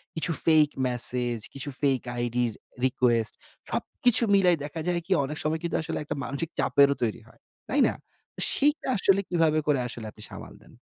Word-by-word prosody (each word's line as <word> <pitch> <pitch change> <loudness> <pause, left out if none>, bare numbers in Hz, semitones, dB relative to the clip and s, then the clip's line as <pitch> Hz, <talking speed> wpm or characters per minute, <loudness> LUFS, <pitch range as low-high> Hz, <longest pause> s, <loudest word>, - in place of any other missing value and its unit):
কিছু 165 +1 0
fake 155 -2 +5 0.2
message, 125 -1 0 0.2
কিছু 140 +1 -5
fake 135 -3 +2 0.2
আইডির 120 -1 0 0.3
রিকোয়েস্ট 120 -3 +2 0.4
সবকিছু 245 -1 +1
মিলাই 185 -3 +5
দেখা 150 +2 -6
যায় 175 -1 +1
কি 195 - -11
অনেক 150 +2 -5
সময় 155 +1 0
কিন্তু 170 - -2
আসলে 160 0 -4
একটা 145 0 -4
মানসিক 140 +5 -3
চাপেরও 140 0 +4
তৈরি 115 0 -2
হয়। - - -21 0.3
তাই - - +1
না? - - -1 0.6
সেইটা 295 +2 +1
আসলে 195 0 +4
কিভাবে 165 -3 +2
করে 145 -3 +3
আসলে 115 -2 -2
আপনি 105 - -13
সামাল - - -9
দেন? - - -19
145 Hz, 170 wpm, -27 LUFS, 125-165 Hz, 0.6 s, fake